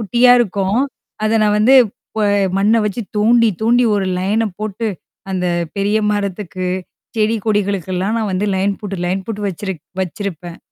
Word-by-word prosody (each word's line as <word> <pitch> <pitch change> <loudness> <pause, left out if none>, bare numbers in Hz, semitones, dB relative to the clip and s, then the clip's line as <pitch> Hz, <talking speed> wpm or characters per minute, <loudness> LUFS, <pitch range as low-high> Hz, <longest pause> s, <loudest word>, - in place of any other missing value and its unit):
குட்டியா 240 +3 +4
இருக்கும். 200 +1 0 0.4
அத 220 +1 +2
நான் 210 0 +3
வந்து 245 +6 +5 0.4
ப - - -1 0.4
மண்ண 215 +3 +3
வச்சு 215 +3 -3 0.2
தோண்டி, 230 +2 +4
தோண்டி 240 +2 +4
ஒரு 195 -2 0
லயன 210 +4 +1
போட்டு 215 +1 -3 0.5
அந்த 180 -1 -1 0.3
பெரிய 200 +2 +1 0.2
மரத்துக்கு, 195 -2 -3 0.5
செடி 220 +1 +2
கொடிகளுக்கெல்லாம் 200 -1 0
நான் 215 -3 -1
வந்து 190 +3 0
லைன் 195 +1 0
போட்டு, 200 -2 -4
லைன் 190 +1 -1
போட்டு 210 -2 -4
வச்சிருக் 190 -3 -5 0.2
வச்சிருப்பேன். 175 -2 -6
205 Hz, 145 wpm, -18 LUFS, 190-220 Hz, 0.5 s, வந்து